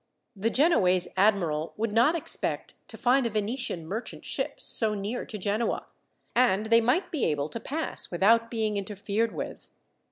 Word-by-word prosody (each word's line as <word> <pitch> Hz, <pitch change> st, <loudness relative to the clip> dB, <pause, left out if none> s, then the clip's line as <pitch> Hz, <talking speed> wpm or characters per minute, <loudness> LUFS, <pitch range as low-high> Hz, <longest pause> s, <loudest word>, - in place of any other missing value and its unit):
The 210 Hz, +3 st, 0 dB
Genoese 190 Hz, -, +3 dB
admiral 180 Hz, -6 st, +1 dB
would 220 Hz, 0 st, -1 dB
not 240 Hz, +9 st, +4 dB
expect 335 Hz, -, -3 dB
to -, -, -9 dB
find 255 Hz, 0 st, +3 dB
a -, -, -2 dB
Venetian 215 Hz, -4 st, -2 dB
merchant 210 Hz, +8 st, -6 dB
ship -, -, -3 dB
so 215 Hz, -2 st, +1 dB
near 205 Hz, +5 st, -4 dB
to 215 Hz, -, -6 dB
Genoa, 210 Hz, +4 st, -1 dB, 0.5 s
and 225 Hz, -4 st, +3 dB
they 230 Hz, +1 st, +5 dB
might 250 Hz, +12 st, +1 dB
be 310 Hz, -, -2 dB
able 150 Hz, -1 st, -1 dB
to 230 Hz, -, -6 dB
pass 310 Hz, +7 st, +1 dB
without 230 Hz, +6 st, +3 dB
being 220 Hz, -3 st, -1 dB
interfered 205 Hz, +3 st, -2 dB
with. -, -, -7 dB
220 Hz, 160 wpm, -27 LUFS, 195-235 Hz, 0.5 s, they